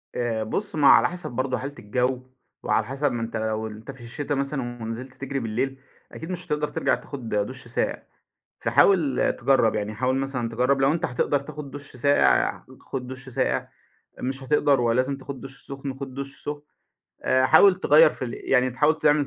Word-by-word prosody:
آآ، 115 Hz, -2 st, -1 dB
بُص، 195 Hz, -, -3 dB
ما 145 Hz, -3 st, +4 dB
هو -, -, +10 dB
على -, -, +6 dB
حسب 175 Hz, -4 st, -6 dB
برضه 130 Hz, +1 st, -1 dB
حالة 140 Hz, +2 st, -6 dB
الجو، 125 Hz, +4 st, -1 dB, 0.4 s
وعلى 110 Hz, -, +1 dB
حسب 135 Hz, +4 st, -1 dB
ما 120 Hz, -, -3 dB
أنت 115 Hz, 0 st, -3 dB
لو 110 Hz, 0 st, -2 dB
أنت 110 Hz, +4 st, -9 dB
في 130 Hz, -2 st, -15 dB
الشتا 145 Hz, +5 st, -3 dB
مثلًا 135 Hz, -4 st, -3 dB
ونزِلت 120 Hz, +4 st, -6 dB
تجري 140 Hz, +1 st, -4 dB
بالليل، 130 Hz, +4 st, -2 dB, 0.3 s
أكيد 160 Hz, +3 st, -7 dB
مش 180 Hz, -1 st, -5 dB
هتقدَر 150 Hz, 0 st, 0 dB
ترجع 150 Hz, -, +1 dB
تاخد 130 Hz, -5 st, -8 dB
دُش 105 Hz, -1 st, -2 dB
ساقع، -, -, -1 dB, 0.6 s
فحاول 160 Hz, -10 st, +3 dB
تجرّب، 130 Hz, -5 st, +3 dB
يعني 105 Hz, 0 st, -2 dB
حاول 130 Hz, +4 st, 0 dB
مثلًا 135 Hz, -3 st, -2 dB
تجرّب 125 Hz, +4 st, +1 dB
لو 135 Hz, +2 st, +4 dB
أنت 165 Hz, -, 0 dB
هتقدر 135 Hz, +3 st, 0 dB
تاخد 145 Hz, 0 st, -8 dB
دُش 145 Hz, -1 st, -10 dB
ساقع، 140 Hz, +4 st, +3 dB, 0.2 s
خُد 130 Hz, -2 st, -5 dB
دُش 130 Hz, +1 st, -8 dB
ساقع، 130 Hz, -, -1 dB, 0.5 s
مش 135 Hz, +1 st, -3 dB
هتقدَر 140 Hz, -1 st, +3 dB
ولازم 125 Hz, +4 st, +1 dB
تاخد 135 Hz, -1 st, -8 dB
دُش 135 Hz, 0 st, -10 dB
سُخن، 135 Hz, -1 st, -5 dB
خُد 135 Hz, -1 st, -7 dB
دُش 140 Hz, +1 st, -6 dB
سُخن، 145 Hz, 0 st, -4 dB, 0.6 s
آآ 130 Hz, 0 st, +3 dB
حاول 185 Hz, +6 st, +7 dB
تغيّر 155 Hz, 0 st, +6 dB
في 130 Hz, -, -6 dB
ال 120 Hz, -, -5 dB, 0.2 s
يعني 130 Hz, -1 st, +4 dB
تحاول 150 Hz, +5 st, +2 dB
تعمل 150 Hz, -1 st, +3 dB
135 Hz, 185 wpm, -25 LUFS, 120-145 Hz, 0.6 s, هو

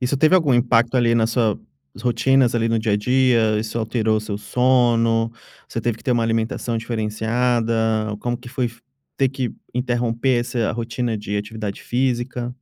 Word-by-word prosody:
Isso 125 Hz, +2 st, 0 dB
teve 155 Hz, +6 st, +4 dB
algum 160 Hz, -7 st, +4 dB
impacto 120 Hz, 0 st, +3 dB
ali 115 Hz, -1 st, +3 dB
na 115 Hz, -1 st, +3 dB
suas 115 Hz, -2 st, 0 dB, 0.4 s
rotinas 125 Hz, +1 st, +2 dB
ali 115 Hz, 0 st, +1 dB
no 115 Hz, 0 st, +1 dB
dia 110 Hz, -1 st, 0 dB
a -, -, +3 dB
dia, 115 Hz, -2 st, +2 dB
isso 110 Hz, +2 st, -3 dB
alterou 110 Hz, -1 st, 0 dB
o 110 Hz, -, 0 dB
seu 105 Hz, -1 st, -4 dB
sono, 115 Hz, 0 st, +2 dB, 0.4 s
você 115 Hz, -, -4 dB
teve 115 Hz, -1 st, -1 dB
que -, -, -19 dB
ter 125 Hz, -, +2 dB
uma 120 Hz, -, +1 dB
alimentação 115 Hz, +1 st, -1 dB
diferenciada, 115 Hz, +1 st, -1 dB, 0.5 s
como 120 Hz, 0 st, -2 dB
que 125 Hz, 0 st, -12 dB
foi 125 Hz, -2 st, -2 dB, 0.5 s
ter 135 Hz, -1 st, +2 dB
que 130 Hz, -3 st, -3 dB, 0.2 s
interromper 120 Hz, 0 st, 0 dB
essa 120 Hz, -2 st, -1 dB
rotina 115 Hz, 0 st, -2 dB
de 105 Hz, 0 st, -4 dB
atividade 105 Hz, -1 st, -5 dB
física? 125 Hz, -1 st, -2 dB
120 Hz, 170 wpm, -21 LUFS, 110-125 Hz, 0.5 s, teve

